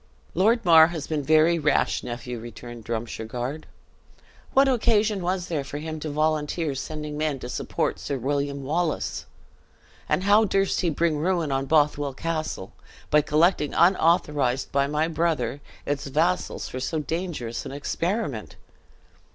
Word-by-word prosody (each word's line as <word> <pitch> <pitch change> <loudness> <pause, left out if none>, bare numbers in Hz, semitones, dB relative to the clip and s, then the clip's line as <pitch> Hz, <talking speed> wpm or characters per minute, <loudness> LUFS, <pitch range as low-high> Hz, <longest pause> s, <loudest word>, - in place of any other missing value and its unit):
"Lord 220 +6 +2
Mar 160 -2 +8
has 165 -3 -5
been 155 -2 -2
very 155 +3 +4
rash, 150 -2 +1
nephew," 120 0 -6
returned 120 0 -9
Drumshargard. 120 +5 -4 0.9
"What 270 +1 +6
occasion 215 -5 +2
was 180 0 -1
there 160 -6 -2
for 140 +2 -6
him 155 +1 -5
to 155 - -4
volunteer 155 +1 0
sending 150 +2 -5
men 155 -2 0
to 125 - -7
support - - -2
Sir 140 - -3
William 140 +2 -2
Wallace? 160 +3 -2 0.8
and 185 - +1
how 205 +2 +5
durst 195 -1 +1
he 175 - +1
bring 160 0 +1
ruin 170 -2 0
on 135 0 -1
Bothwell 145 -2 +2
Castle, 155 -11 -3 0.4
by 150 - +6
collecting 150 0 +2
unauthorized 150 -7 +2
by 140 0 +2
my 150 +2 0
brother, 155 -5 -1 0.2
its 145 -1 -2
vassals 160 +7 0
for 130 - -6
so 160 +5 -2
dangerous 155 -7 -3
an - - -7
experiment?" 145 - -3
150 Hz, 145 wpm, -25 LUFS, 140-170 Hz, 0.9 s, Mar